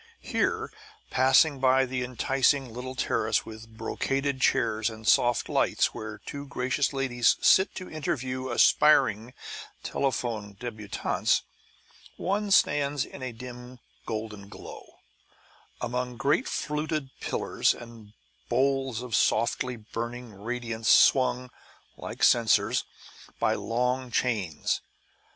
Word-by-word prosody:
Here, - - -1 0.4
passing 135 +3 +4
by 130 0 +4
the 125 0 -3
enticing 130 0 +1
little 130 +2 -6
terrace 110 -3 0
with 110 0 -11
brocaded 135 +4 -2
chairs 110 -1 +2
and 110 -1 -9
soft 120 +1 +3
lights - - +1
where 110 0 -7
two 140 0 -7
gracious 130 +2 0
ladies 130 -4 +2
sit 190 - +4
to 185 - -6
interview 130 -5 -3
aspiring 120 -3 +4 0.5
telephone 115 -7 -2
débutantes, 110 -2 -1 0.7
one 205 +2 -1
stands 145 -6 +3
in - - -11
a 130 -1 -4
dim 125 +1 -10 0.3
golden 110 -3 -5
glow, - - -11 0.8
among 125 0 -3
great 140 +6 +1
fluted 150 -2 -2
pillars - - 0
and 115 -3 -13 0.4
bowls 135 -1 +1
of 125 -3 -2
softly 120 +3 +1
burning 120 +1 -6
radiance 115 +2 -3
swung 125 -1 +4 0.4
(like - - -6
censers) 115 0 +4 0.5
by - - +2
long 125 +2 -1
chains. 105 -10 -1
125 Hz, 110 wpm, -27 LUFS, 115-135 Hz, 0.8 s, passing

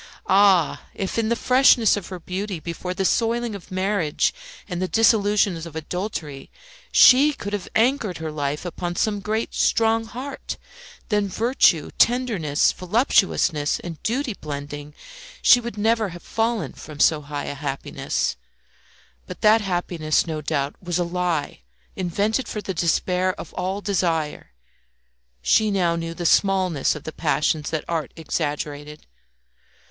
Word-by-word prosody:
Ah! 190 -3 +3
if 195 +3 -2
in 220 -1 0
the 235 - +2
freshness 250 -3 +4
of 205 -4 -6
her 185 -2 -7
beauty, 185 +1 -4
before 170 +3 -5
the 190 - -1
soiling 235 +2 +1
of 200 -4 -9
marriage 185 -4 0 0.3
and 180 -2 -4
the 185 - 0
disillusions 205 -5 +2
of 160 - -12
adultery, 160 -4 -5 0.4
she 280 +4 +7
could 205 -6 -6
have 205 -3 -4
anchored 225 -5 +1
her 160 -1 -5
life 145 +1 -3
upon 175 0 -4
some 205 +3 0
great, 215 +3 -2
strong 225 0 +2
heart, 260 +5 -6 0.5
then 210 -2 +1
virtue, 195 - +2
tenderness, 220 - +2
voluptuousness, 180 - +1
and 165 -3 -8
duty 250 +1 -1
blending, 145 -2 -7 0.5
she 245 - +7
would 235 -3 -7
never 220 0 +1
have 175 0 -10
fallen 225 -1 -1
from 150 -2 -11
so 155 0 +4
high 145 0 -5
a - - -4
happiness. 140 - -3 0.9
But - - -9
that 220 +1 +5
happiness, 175 -5 0
no 155 -2 -4
doubt, 145 -1 -2
was 175 -2 -2
a 180 - +1
lie 175 - -2 0.3
invented 205 +7 -1
for 215 - -4
the 195 -2 -4
despair 180 +2 0
of - - -9
all 190 +2 -3
desire. 170 -7 -1 0.9
She 215 - +3
now 180 -4 +1
knew 165 0 -4
the 175 - -5
smallness 185 -6 +2
of 150 - -8
the 155 - -7
passions 150 -1 0
that 155 -2 -3
art 160 -5 -2
exaggerated. 150 -2 -4
180 Hz, 145 wpm, -23 LUFS, 155-215 Hz, 0.9 s, she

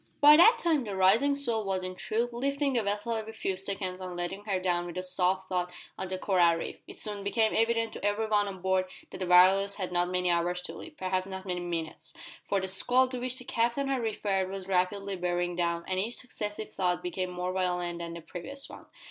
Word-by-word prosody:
By 295 +1 +9
that 355 +9 +7
time 320 -5 +1
the 205 -4 -5
rising 215 +10 +4
swell 235 -6 -1
was 190 -2 -1
in 185 0 -4
truth 230 +6 -2
lifting 275 +3 0
the 240 - +2
vessel 210 +3 -2
every 220 0 -4
few 195 -3 -2
seconds 190 -1 -3
and 180 -1 -6
letting 175 +4 -4
her 195 -3 0
down 175 -1 0
with 175 0 -7
a 185 - -2
soft 185 +1 +1
thud 180 -1 -1 0.3
on 190 - -4
the 185 0 -3
coral 180 -3 +3
reef. 165 - -5
It - - -11
soon 205 -2 -4
became 220 +2 +2
evident 230 0 +1
to - - -8
every 205 +2 +1
one 205 -1 +2
on 190 -2 -7
board 190 0 +2 0.3
that - - -8
the 185 - -2
Walrus 190 +3 +6
had 185 -3 -4
not 175 0 +1
many 180 -1 +1
hours 175 +1 0
to - - -4
live 330 -2 -10
perhaps 185 0 -1
not 190 0 -7
many 180 -2 -2
minutes 170 - -5 0.3
for 200 - +2
the 190 - -3
squall 250 +7 +3
to 255 -1 -4
which 255 +1 -2
the 250 - -9
Captain 240 +5 0
had 265 -2 0
referred 200 -4 -1
was 190 -1 -6
rapidly 195 +1 0
bearing 175 -1 -1
down, 170 -1 -1
and 185 0 0
each 225 +5 -1
successive 215 -3 -5
thud 180 -2 0
became 180 +1 -2
more 180 0 -3
violent 180 -2 -1
than 170 0 -5
the 170 - -7
previous 190 - -6
one. - - -12
190 Hz, 230 wpm, -29 LUFS, 180-220 Hz, 0.3 s, By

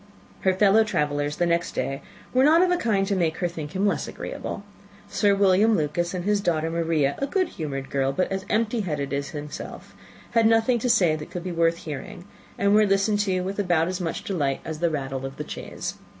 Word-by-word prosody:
Her 190 - +2
fellow 205 +3 +5
travellers 145 -7 -1
the 175 - +1
next 170 0 0
day 135 0 -2 0.3
were 255 +1 +4
not 320 +5 +6
of 365 - +2
a - - +4
kind 215 - +1
to 200 - 0
make 165 -3 0
her 175 - 0
think 160 -3 -7
him 195 +2 +1
less 200 - 0
agreeable. 200 - -6 0.4
Sir 205 0 +2
William 200 +3 +4
Lucas, 170 +4 -1
and 180 0 -4
his 205 0 +2
daughter 165 -3 0
Maria, 165 -4 +1
a 275 - -1
good 370 +3 0
humoured 135 -4 -5
girl, 135 -1 +1
but 185 +8 -1
as 190 0 -2
empty 225 +2 +1
headed 150 -8 -2
as 140 0 -2
himself, 150 -1 -8 0.4
had 230 -1 +4
nothing 225 +2 +3
to 250 - -1
say 175 -8 +4
that 155 -1 -7
could 175 - -6
be 185 - -4
worth 165 0 +2
hearing, 160 +4 -7 0.3
and 200 0 +3
were 215 0 +5
listened 195 +2 +2
to 190 -3 +1
with 195 +3 -4
about 175 -4 +2
as 185 0 -3
much 165 -2 -3
delight 145 -8 -1
as 160 -1 -5
the 170 0 +2
rattle 135 -3 -3
of 135 0 -6
the 150 - -5
chaise. - - -6
180 Hz, 220 wpm, -25 LUFS, 155-205 Hz, 0.4 s, not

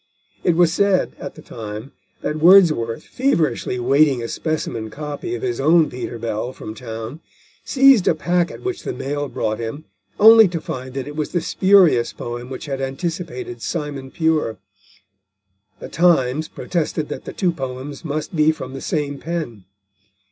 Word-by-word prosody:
It 175 - +3
was 170 -1 +4
said, 200 -1 +2
at - - -7
the - - -13
time, 110 +4 -8 0.3
that 150 - -2
Wordsworth, 155 -9 +5
feverishly 165 - 0
awaiting 135 +1 +3
a - - -3
specimen 115 -7 -3
copy 150 - -5
of 375 - -7
his 370 -2 -2
own 160 0 +4
Peter 125 -1 -5
Bell 115 +2 -3
from 110 - -8
town, 115 +4 -7 0.4
seized 270 -7 +5
a - - +4
packet 175 +2 -1
which 380 -1 -3
the - - -4
mail 145 +2 -3
brought 110 -3 -2
him, 120 +7 -5 0.3
only 220 0 +9
to 170 -2 -3
find 130 -3 -6
that 135 0 -4
it 145 - -7
was 155 -1 -3
the 175 - +2
spurious 185 -9 +4
poem 120 +1 -6
which 130 +2 -7
had 135 -2 -4
anticipated 135 -3 -4
Simon 140 -2 -4
Pure. 160 -7 0 1.2
The - - -7
Times 155 -4 +2
protested 160 -3 -2
that - - -6
the - - -5
two 180 -3 +1
poems 135 -2 -6
must 155 +2 -4
be 155 0 +4
from 130 -4 -7
the 135 - -7
same 145 -3 -2
pen. 155 - -5
150 Hz, 160 wpm, -21 LUFS, 125-170 Hz, 1.2 s, only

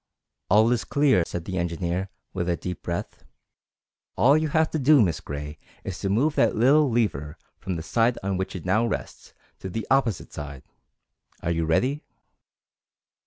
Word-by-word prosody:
_" - - -60 0.5
"All 110 +4 +5
is 120 - +1
clear," 140 -9 +3
said 85 -1 -5
the 95 -2 -3
engineer, 85 +2 -2 0.2
with 90 -2 -2
a 85 - +1
deep 90 0 -6
breath. 85 0 -5 0.9
"All 140 +4 +5
you 155 0 +1
have 160 +1 +1
to 160 - -1
do, 145 +2 +5
Miss 85 -8 +2
Gray, 75 +1 -7 0.2
is 95 -2 -5
to 95 - -2
move 130 +10 +2
that 115 - +2
little 140 +6 +4
lever 85 - -1 0.2
from 95 -2 -4
the 80 - -5
side 115 +8 +1
on 100 0 -1
which 95 +1 -3
it 90 - -7
now 100 +5 +2
rests - - -6 0.2
to 95 - -6
the 110 +4 -4
opposite 130 -7 +1
side. 75 -3 -7 0.8
Are 85 - 0
you 85 -1 0
ready?" 130 - +1
95 Hz, 175 wpm, -25 LUFS, 85-125 Hz, 0.9 s, All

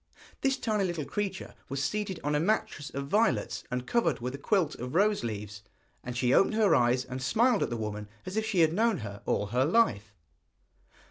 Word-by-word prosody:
This 270 0 +1
tiny 215 -5 0
little 170 -5 -2
creature 195 0 -4 0.2
was 135 +1 -2
seated 205 +1 -2
on 145 +1 0
a 150 - +2
mattress 170 -5 -1
of 140 0 -4
violets, 140 - +1
and 125 0 -3
covered 235 - +1
with 125 +2 -4
a 140 - -6
quilt 175 -2 +1
of 125 +4 -6
rose 205 -1 +3
leaves, 105 -3 -5 0.4
and 125 -1 -5
she 125 0 +2
opened 210 - +4
her 210 -6 +4
eyes 125 +1 +3
and 130 +1 -6
smiled 225 - +2
at - - 0
the 120 - -3
woman 105 -1 -5 0.2
as 185 - -6
if 220 - +1
she 210 -5 +1
had 160 0 +4
known 225 +2 +2
her 100 0 -8
all - - +1
her 125 +1 +3
life. 115 - +1
150 Hz, 205 wpm, -29 LUFS, -, 0.4 s, opened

